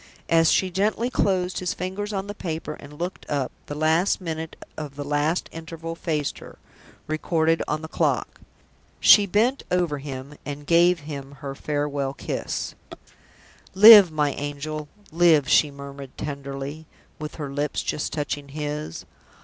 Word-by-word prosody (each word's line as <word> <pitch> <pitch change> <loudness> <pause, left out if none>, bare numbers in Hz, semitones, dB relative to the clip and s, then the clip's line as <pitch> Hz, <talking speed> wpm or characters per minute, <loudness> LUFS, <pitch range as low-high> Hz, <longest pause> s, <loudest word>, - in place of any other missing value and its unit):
As 165 -1 +5
she 190 -1 +2
gently 215 +6 0
closed 185 -5 +1
his 180 -2 -2
fingers 190 +3 -4
on 195 -1 -2
the 205 - -6
paper 165 -6 -4
and 150 0 -12
looked 175 +3 -4
up, 140 -3 -1 0.2
the 145 - -5
last 160 +5 +2
minute 160 -3 -5 0.2
of 150 -3 -7
the 145 - -4
last 145 +4 0
interval 165 0 -7
faced 155 -3 -2
her, - - -12 0.5
recorded 160 +1 +1
on 155 +1 -2
the - - -5
clock. - - -1 0.6
She 205 -1 +7
bent 230 +8 +2
over 175 -5 0
him, 135 0 -7
and 145 +1 -6
gave 170 +1 +4
him 140 -2 -7
her 135 0 -7
farewell 145 -1 -2
kiss. - - -4 1.0
"Live, 205 -3 +10
my 150 -2 +1
angel, 145 +1 -5 0.2
live!" 165 -4 +4
she 150 - +5
murmured, 140 -1 -10
tenderly, 140 +1 -6 0.3
with 150 0 -6
her 145 -3 -5
lips 145 +1 -2
just 150 - -2
touching 145 -1 -3
his. 150 - -5
155 Hz, 150 wpm, -24 LUFS, 145-175 Hz, 1.0 s, Live